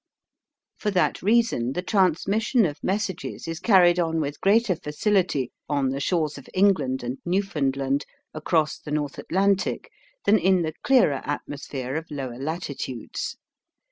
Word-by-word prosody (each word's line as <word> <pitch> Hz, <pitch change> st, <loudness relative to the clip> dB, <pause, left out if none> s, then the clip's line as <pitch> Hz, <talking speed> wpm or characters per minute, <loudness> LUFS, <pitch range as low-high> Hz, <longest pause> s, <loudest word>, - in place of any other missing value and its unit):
For 210 Hz, -, 0 dB
that 185 Hz, -3 st, +1 dB
reason 210 Hz, -, +2 dB
the 180 Hz, -, -3 dB
transmission 200 Hz, -, +2 dB
of 150 Hz, -3 st, -4 dB
messages 195 Hz, -4 st, -3 dB
is 165 Hz, -1 st, -4 dB
carried 180 Hz, -4 st, +5 dB
on 165 Hz, -1 st, 0 dB
with 145 Hz, -1 st, -3 dB
greater 205 Hz, -1 st, +3 dB
facility 165 Hz, -, 0 dB, 0.2 s
on 140 Hz, -3 st, +1 dB
the 135 Hz, -, -3 dB
shores 155 Hz, -1 st, 0 dB
of 140 Hz, -, -15 dB
England 185 Hz, -10 st, +2 dB
and 125 Hz, +2 st, -4 dB
Newfoundland 140 Hz, -7 st, 0 dB, 0.3 s
across 155 Hz, 0 st, 0 dB
the -, -, -10 dB
North 150 Hz, -2 st, -2 dB
Atlantic 195 Hz, +2 st, 0 dB, 0.3 s
than 215 Hz, +1 st, +5 dB
in 185 Hz, -1 st, +3 dB
the 160 Hz, -1 st, -3 dB
clearer 240 Hz, -, +3 dB
atmosphere 140 Hz, -2 st, -5 dB
of 160 Hz, 0 st, -6 dB
lower 130 Hz, -4 st, -5 dB
latitudes. 140 Hz, -5 st, -4 dB
160 Hz, 140 wpm, -25 LUFS, 140-195 Hz, 0.3 s, carried